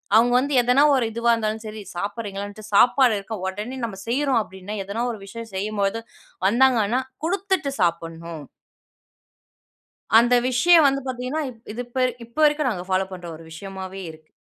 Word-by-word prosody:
அவுங்க 240 Hz, +2 st, +5 dB
வந்து 280 Hz, +2 st, -1 dB
எதனா 250 Hz, +3 st, +3 dB
ஒரு 250 Hz, -, +2 dB
இதுவா 235 Hz, +1 st, +2 dB
இருந்தாலும் 220 Hz, -1 st, -2 dB
சரி, 215 Hz, 0 st, -7 dB
சாப்பிடுறீங்களான்னுட்டு, 205 Hz, +1 st, -5 dB
சாப்பாடு 245 Hz, +2 st, +5 dB
இருக்க, 220 Hz, +3 st, -6 dB
உடனே 210 Hz, +7 st, -5 dB
நம்ம 195 Hz, -4 st, -7 dB
செய்யுறோம் 265 Hz, 0 st, +2 dB
அப்படீன்னா, 190 Hz, +2 st, -8 dB
எதனா 220 Hz, +4 st, -3 dB
ஒரு 220 Hz, -, -9 dB
விஷயம் 230 Hz, +2 st, -8 dB
செய்யும்போது 205 Hz, +2 st, -1 dB, 0.5 s
வந்தாங்கன்னா, 240 Hz, 0 st, +3 dB, 0.3 s
குடுத்துட்டு 375 Hz, -3 st, 0 dB
சாப்புட்ணும். 165 Hz, -2 st, -2 dB, 1.8 s
அந்த 240 Hz, +1 st, +4 dB
விஷயம் 320 Hz, +6 st, +5 dB
வந்து 275 Hz, 0 st, 0 dB
பாத்தீங்கன்னா, 255 Hz, +5 st, -3 dB
இப் 230 Hz, -2 st, -18 dB
இது 245 Hz, +3 st, -4 dB
இப்ப 255 Hz, +1 st, 0 dB, 0.2 s
இப்ப 235 Hz, -, -17 dB
வரைக்கும் 295 Hz, -5 st, 0 dB
நாங்க 180 Hz, -, -7 dB
ஃபாலோ 185 Hz, 0 st, +2 dB
பண்ற 175 Hz, -1 st, -8 dB
ஒரு 165 Hz, -, -13 dB
விஷயமாவே 190 Hz, +2 st, -7 dB
இருக்கு. 155 Hz, 0 st, -16 dB
225 Hz, 150 wpm, -23 LUFS, 195-255 Hz, 1.8 s, அவுங்க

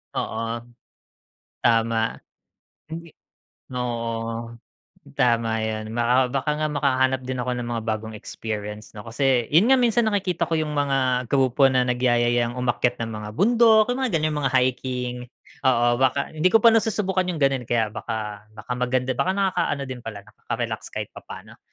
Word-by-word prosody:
Oo. 115 Hz, +1 st, -2 dB, 1.0 s
Tama. 115 Hz, 0 st, +2 dB, 0.7 s
Hindi 165 Hz, +1 st, -8 dB, 0.7 s
oo, 115 Hz, -1 st, -3 dB, 0.6 s
tama 115 Hz, -2 st, +2 dB
'yon. 110 Hz, 0 st, -3 dB
Baka 125 Hz, +2 st, +2 dB
baka 135 Hz, +3 st, -1 dB
nga 155 Hz, 0 st, 0 dB
makahanap 130 Hz, -2 st, +1 dB
din 130 Hz, -1 st, -3 dB
ako 125 Hz, -, -2 dB
ng 120 Hz, -1 st, -4 dB
mga 115 Hz, -1 st, -2 dB
bagong 110 Hz, 0 st, -3 dB
experience, 105 Hz, 0 st, -6 dB
'no? 105 Hz, -, -8 dB
Kasi, 125 Hz, 0 st, +1 dB
'yon 165 Hz, +8 st, +5 dB
nga 265 Hz, -, +6 dB
minsan 235 Hz, -1 st, +3 dB
nakikita 195 Hz, -5 st, 0 dB
ko 165 Hz, -, -1 dB
yung 155 Hz, -1 st, -1 dB
mga 130 Hz, -3 st, +1 dB
grupo 135 Hz, 0 st, +4 dB
na 130 Hz, -1 st, +2 dB
nagyayayang 120 Hz, -1 st, +1 dB
umakyat 125 Hz, -1 st, 0 dB
ng 115 Hz, -, -4 dB
mga 105 Hz, -1 st, -6 dB
bundok. 225 Hz, -, +5 dB
Yung 250 Hz, -, -3 dB
mga 250 Hz, -, -1 dB
ganyang 155 Hz, -1 st, 0 dB
mga 135 Hz, -2 st, 0 dB
hiking. 125 Hz, -1 st, 0 dB, 0.5 s
Oo, 120 Hz, -2 st, +4 dB
baka 135 Hz, +1 st, +1 dB
hindi 160 Hz, +3 st, +2 dB
ko 225 Hz, -, +6 dB
pa 230 Hz, -, +8 dB
nasusubukan 205 Hz, -4 st, +1 dB
yung 170 Hz, -4 st, -3 dB
gano'n 135 Hz, -2 st, +2 dB
eh, -, -, -35 dB
kaya 120 Hz, -2 st, +3 dB
baka 105 Hz, -1 st, -5 dB
baka 110 Hz, +3 st, -6 dB
maganda, 125 Hz, +1 st, 0 dB
baka 185 Hz, -, +2 dB
nakaka-ano 185 Hz, -7 st, 0 dB
din 130 Hz, -, -5 dB
pala, 110 Hz, -2 st, -6 dB
nakaka-relax 105 Hz, -, -4 dB
kahit -, -, -4 dB
papaano. -, -, -11 dB
125 Hz, 155 wpm, -24 LUFS, 115-150 Hz, 1.0 s, pa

